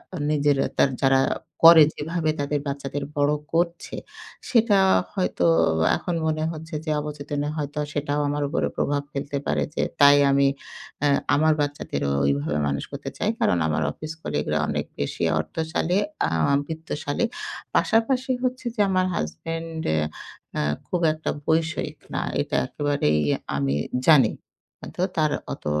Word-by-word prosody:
এ - - -4
নিজের 145 -1 +2 0.2
তার - - +4
যারা 135 0 +5 0.4
করে 165 -1 +10
যেভাবে 160 +1 -2
তাদের 145 +1 0
বাচ্চাদের 140 0 -4
বড় 145 +1 +3 0.2
করছে, 170 +1 -1 0.5
সেটা 230 -4 +4 0.4
হয়তো 185 - 0 0.5
এখন 175 - -3
মনে 155 0 0
হচ্ছে 160 +1 -8
যে 155 - -1
অবচেতনে 145 -1 -4
হয়তো 150 0 -3
সেটাও 145 0 -1
আমার 145 0 -1
উপর 165 - -1 0.2
প্রভাব 145 0 0
ফেলতে 140 0 -3
পারে, - - +1
যে - - +1 0.2
তাই 145 0 +8
আমি 140 0 +4 0.6
এ - - +5 0.3
আমার 155 +2 +4
বাচ্চাদেরও 140 - -2
ওইভাবে 70 +2 0
মানুষ 70 -1 -1
করতে - - -5
চাই। - - 0
কারণ, 90 - +2
আমার 80 0 0
অফিস 155 - -7
কলিগরা 75 +1 -1
অনেক - - -1
বেশি 70 - -2 0.2
অর্থশালী 160 - -1 0.3
আম 80 - +2
বিত্তশালী। 160 +3 -3 0.5
পাশাপাশি 255 +4 +2
হচ্ছে 255 0 -2
যে 215 - -11
আমার 185 -1 +2
হাসব্যান্ড 165 - -4
এ - - +1 0.6
আ - - +1 0.3
খুব 180 - -1
একটা 155 0 -5 0.2
বৈষয়িক 160 0 0 0.2
না। - - 0 0.2
এটা - - -3
একেবারেই 145 - 0 0.2
এ - - +2 0.2
আমি 70 0 0 0.3
জানি। 140 -9 +7 0.5
আ - - -5
তো 180 - -1
তার 155 -1 +2 0.2
অত - - -11
150 Hz, 145 wpm, -24 LUFS, 140-165 Hz, 0.6 s, করে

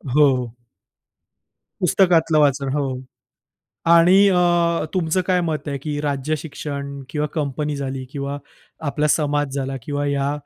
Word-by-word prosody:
हो. 150 -1 +6 1.5
पुस्तकातलं 165 -3 +3
वाचन, 140 -2 +2
हो 135 -3 -2 0.9
आणि 170 +3 +6
अ, 175 -3 +2
तुमचं 180 0 +1
काय 185 -1 +2
मत 155 -1 -3
आहे? 140 -1 -3
की 145 +1 -4
राज्यशिक्षण 140 -1 -4
किंवा 150 -1 -1
कंपनी 150 -1 -2
झाली 135 -1 -4
किंवा 140 0 -4 0.5
आपला 150 +1 0
समाज 145 -2 0
झाला 135 -1 -3
किंवा 145 +2 -3
ह्या 140 0 0
145 Hz, 120 wpm, -21 LUFS, 140-160 Hz, 1.5 s, हो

